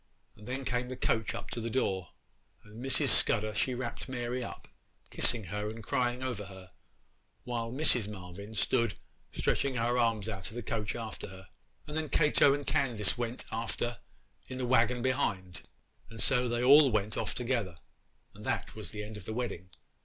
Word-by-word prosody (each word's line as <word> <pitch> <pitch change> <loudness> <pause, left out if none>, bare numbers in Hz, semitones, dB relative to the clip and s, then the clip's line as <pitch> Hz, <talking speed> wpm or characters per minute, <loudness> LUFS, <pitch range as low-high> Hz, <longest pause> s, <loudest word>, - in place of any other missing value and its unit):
And 105 - -14
then 130 +2 -3 0.3
the 130 - -5
coach 110 -2 0
came - - -2
up - - -10
to 120 - -3
the 115 - -2
door, 95 -8 -1 0.5
and 105 +3 -10
Mrs. 135 +1 +3
Scudder 110 -1 +3
she 125 +4 0
wrapped 125 +2 -5
Mary 125 0 -2
up, - - -8 0.4
kissing 120 -3 +4
her 105 +3 -3
and 110 +1 -8
crying 125 +3 0
over 120 -6 -3
her; 95 -2 -12 0.7
while 115 -2 -3
Mrs. 125 -5 +5
Marvyn 100 +1 -8
stood 115 0 +1 0.3
stretching 135 -1 0
her 120 +1 +1
arms 115 -4 +1
out 95 -1 -4
of 110 - -7
the 120 - -4
coach 105 -1 -2
after 110 -2 -5
her. 95 -1 -12 0.4
'And 150 - -7
then 155 -1 -1
Cato 150 -2 +5
and 145 -1 -5
Candace 125 -9 +1
went 120 0 -4
after 115 0 -2 0.5
in 130 - -6
the 130 - -1
waggon 120 0 +3
behind, 100 -9 -1 0.4
and 115 -1 -10
so 125 0 +4
they 120 0 0
all 140 +2 +8
went 110 -2 0
off - - -2
together, 120 -8 -1 0.6
and - - -12
that - - -2
was - - -6
the 105 -1 -5
end 105 0 -8
of 100 - -8
the 110 - -4
wedding. 105 -7 -4
115 Hz, 185 wpm, -31 LUFS, 105-125 Hz, 0.7 s, all